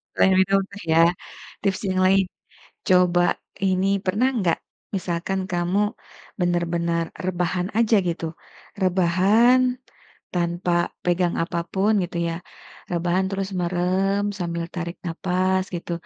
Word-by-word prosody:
Selain 190 - +4
minum 195 +1 +4
teh 200 -1 -9
ya 165 - +6 0.6
tips 195 -1 0
yang 185 0 0
lain, 190 +1 +4 0.6
coba 180 -1 +4 0.3
ini 190 0 +2 0.2
pernah 205 +7 +2
nggak 170 -4 +1 0.4
misalkan 180 +1 -2
kamu 175 +3 0 0.6
bener-bener 170 -1 0 0.2
rebahan 180 0 -1
aja 230 -1 +4
gitu, 170 -1 -2 0.6
rebahan, 190 +7 +4 0.7
tanpa 175 0 -1 0.3
pegang 175 0 +1
apa 170 0 -2
pun 200 +3 +2
gitu 175 - -7
ya, 165 - -2 0.6
rebahan 175 +2 +1
terus 195 -1 -2
merem 185 +3 +1 0.2
sambil 170 -2 -2
tarik 170 0 -4
nafas 185 +2 0
gitu, 170 0 -4
180 Hz, 115 wpm, -23 LUFS, 175-190 Hz, 0.7 s, ya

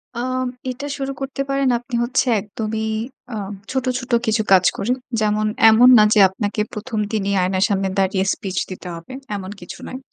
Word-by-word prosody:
আ 235 - -4 0.5
এটা 255 +3 -5
শুরু 275 0 -3
করতে 270 0 -3
পারেন 275 -1 +1
আপনি 245 0 -6
হচ্ছে 255 +3 +1 0.2
একদমই 220 +1 -4 0.5
আ - - -3 0.4
ছোট, 265 -1 -1
ছোট 245 0 -9
কিছু 220 -1 +2
কাজ 185 -1 +6
করে। 205 +5 -1 0.3
যেমন, 215 0 +1 0.2
এমন 240 +3 +7
না 215 - +7
যে 210 - +4
আপনাকে 205 +2 -2
১ম 215 +1 -4
দিনই 200 -2 0
আয়নার 185 +1 +2
সামনে 195 -1 0
দাঁড়িয়ে 190 0 +1
স্পিচ 195 -3 -6
দিতে 185 -1 -8
হবে। 165 +9 -10 0.2
এমন 190 -1 -6
কিছু 175 - -9
নয়। 255 - -6
215 Hz, 180 wpm, -20 LUFS, 195-245 Hz, 0.5 s, এমন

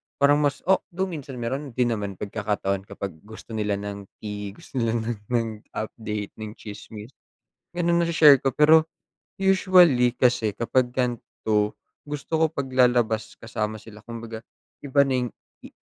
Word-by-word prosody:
parang 145 +1 +4
mas 145 -1 0
o 190 +2 +4 0.2
though 190 - 0
minsan 150 -8 -5
meron 125 +2 -4
din 125 -2 +2
naman 100 -3 -3
pagkakataon 100 -1 -2
kapag 100 - -5 0.2
gusto 110 +1 -11
nila 105 -2 -1
ng 100 0 -6 0.2
tea, 105 -1 -5
gusto 130 - -6
nila 115 0 0 0.2
ng 115 -3 -2
update, 105 -2 -4
ng 110 0 -6
tsismis. 105 +2 -10 0.6
Ganun, 170 -1 +2
nashe-share 160 -4 +7
ko 135 0 -1
pero 155 +1 +6 0.5
usually 180 -10 +5
kasi 120 -4 +2
kapag 120 +4 0
gan'to, 110 -4 -1 0.3
gusto 145 0 -7
ko 160 0 +4
paglalabas 125 -5 +1
kasama 110 -1 -3
sila 105 0 -14
kumbaga 115 -1 -7 0.4
iba 140 0 +3
na 135 - +1
yung 125 - -3 0.3
i - - -11
120 Hz, 145 wpm, -25 LUFS, 105-140 Hz, 0.6 s, nashe-share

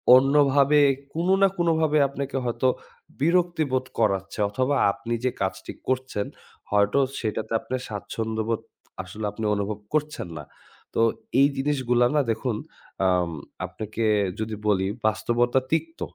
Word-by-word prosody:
অন্যভাবে 140 +1 +5 0.3
কোনো 175 +4 +2
না 195 - +7
কোনো 170 -1 +2
ভাবে 155 -1 +2
আপনাকে 140 0 -5
হয়তো 120 +2 0 0.5
বিরক্তি 170 +2 +2
বোধ 130 0 +1
করাচ্ছে 100 -1 0
অথবা 130 +7 0 0.2
আপনি 115 +4 -5
যে 130 - +2
কাজটি 95 0 -3 0.2
করছেন। 130 -5 -1 0.5
হয়তো 105 +6 +3 0.2
সেটাতে 110 -1 -3
আপনে 130 - -4
স্বাচ্ছন্দ্য 110 +1 -3
বোধ 115 - 0 0.4
আসলে 105 +4 -6
আপনি 110 - -5
অনুভব 100 +1 -2
করছেন 150 -10 -1
না। 75 - -6 0.5
তো - - +1 0.4
এই 140 - +7
জিনিসগুলা 130 -4 +2
না 145 - +5
দেখুন, 110 0 -1 0.5
আম 90 -2 +2 0.3
আপনাকে 110 +1 -4 0.3
যদি 110 0 -3
বলি, 95 -2 +2 0.2
বাস্তবতা 120 +3 +2
তিক্ত, 165 +1 -1
120 Hz, 135 wpm, -25 LUFS, 105-145 Hz, 0.5 s, না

